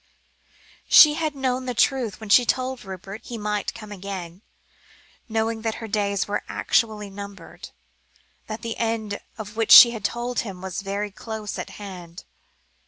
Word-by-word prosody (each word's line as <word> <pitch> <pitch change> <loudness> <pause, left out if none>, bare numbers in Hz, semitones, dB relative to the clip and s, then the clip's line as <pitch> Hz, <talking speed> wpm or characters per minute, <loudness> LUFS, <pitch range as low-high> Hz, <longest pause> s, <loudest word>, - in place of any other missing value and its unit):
She 300 -1 +9
had 310 -1 -2
known 260 -1 -2
the 250 - -3
truth 245 -3 +1
when 220 -2 -9
she 245 +5 +7
told 255 +1 -1
Rupert 195 +2 -8
he 240 - -6
might 210 -1 -2
come 215 -2 -10
again, 190 -2 -7 0.9
knowing 220 0 -1
that 225 -1 -2
her 225 - -7
days 200 -2 -1
were 205 0 -2
actually 215 -3 0
numbered, 200 -3 -10 0.8
that 215 0 -6
the 230 -1 -4
end 225 -3 -2 0.2
of 215 -1 -8
which 225 -1 -1
she 235 - +11
had 225 -4 -7
told 240 +4 -2
him, 195 -5 -5
was 190 +1 -5
very 200 +1 -3
close 215 0 -6
at - - -5
hand. 180 -4 -9
215 Hz, 160 wpm, -24 LUFS, 200-230 Hz, 0.9 s, she